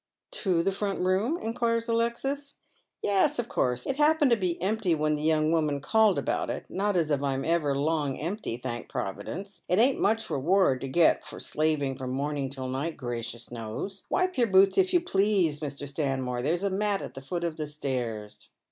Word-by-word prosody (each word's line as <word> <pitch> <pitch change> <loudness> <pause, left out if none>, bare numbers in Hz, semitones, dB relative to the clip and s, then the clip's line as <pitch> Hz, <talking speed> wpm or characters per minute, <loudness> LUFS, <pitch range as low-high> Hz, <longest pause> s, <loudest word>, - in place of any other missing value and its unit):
" - - -62
To 180 -5 +2
tlie 195 - +1
front 200 0 -2
room? 195 - +1
" - - -11
inquires 230 0 0
Alexis. 235 +5 -1 0.5
"Yes, 205 +9 +3
of 240 -1 -2
course. 125 - 0
It 270 - -2
happened 300 -2 +4
to - - +7
be 185 -5 -2
empty 195 -1 +1
when 155 0 +1
the 150 - -2
young 155 0 +2
.Wiliiman 155 -3 +1
called 220 +1 +4
about - - -1
it - - -4
— - - -34
not 200 0 0
as 160 -3 +1
I'm 135 -1 0
ever 155 -4 +1
long 145 -1 0
empty, 170 - -3
thank 120 -1 -5
Provi 95 +1 -4
dence. 195 +2 -7
It 180 - +3
ain't 255 +5 +4
much 225 +2 +1
reward 145 -2 +2
to 135 - -3
get 165 +5 +3
for - - -9
slaving 150 -4 0
from 130 -1 -4
morning 140 0 -2
till 130 -1 -4
night, 140 +6 -3
gracious 120 -2 -5
knows. 120 - -6
Wipe 370 -5 0
your 240 - +4
boots, 195 -1 +5
if 375 -1 +3
you 355 -2 +4
please, 195 - +2
Mr. 145 -1 -5
Sbmniore. 135 -4 -2
There's 165 +8 0
a 200 - +1
mat 200 +1 0
at - - -7
the 135 - -8
foot 170 +6 -4
of 170 -2 -2
the 155 -1 -3
stairs." 125 -8 -4
165 Hz, 205 wpm, -28 LUFS, 140-210 Hz, 0.5 s, to